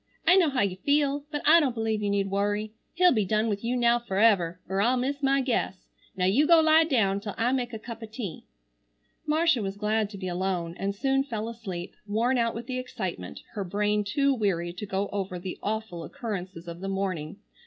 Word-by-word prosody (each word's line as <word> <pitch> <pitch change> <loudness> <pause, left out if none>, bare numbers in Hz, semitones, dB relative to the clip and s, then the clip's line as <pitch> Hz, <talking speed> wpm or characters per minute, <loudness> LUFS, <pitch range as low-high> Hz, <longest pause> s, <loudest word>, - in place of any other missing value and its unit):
I 350 +3 +6
know 360 -5 +5
how 265 -3 0
you 190 -2 0
feel, 285 +4 +1
but 295 -1 -4
I 325 +3 +8
don't 270 -6 0
believe 220 -1 -1
you 205 - 0
need 200 -1 0
worry. 205 +2 0 0.2
He'll 360 0 +5
be 220 -5 +2
done 215 +3 +1
with 205 0 -2
you 245 +2 0
now 240 0 +3
forever, 195 -6 +2
er 190 +1 0
I'll 245 +4 +3
miss 275 +3 -2
my 275 0 +3
guess. 235 -7 -1 0.3
Now 180 -1 0
you 250 +11 +3
go 335 -1 +7
lie 320 0 +5
down 210 -10 +2
till 205 -1 -6
I 235 +2 +2
make 250 -2 -1
a 225 - -5
cup 230 +1 -9
o' 225 - -6
tea." 215 -6 -6 0.8
Marcia 315 -4 +3
was 195 0 -4
glad 210 0 0
to 205 - -9
be 185 -1 -5
alone, 180 -2 -2
and 200 +1 -2
soon 270 +4 +1
fell 225 -5 -4
asleep, 195 -7 -6
worn 235 +5 +1
out 230 -1 +1
with 230 +1 -5
the 255 +1 -3
excitement, 190 - -5
her 205 - -3
brain 210 +3 0
too 275 +7 +2
weary 180 -7 -1
to 190 +4 -7
go 195 +1 -1
over 195 -3 -3
the 180 +1 -6
awful 210 -5 -3
occurrences 190 -8 -6
of 170 0 -7
the 195 +1 -4
morning. 185 -6 -3
215 Hz, 215 wpm, -27 LUFS, 195-255 Hz, 0.8 s, I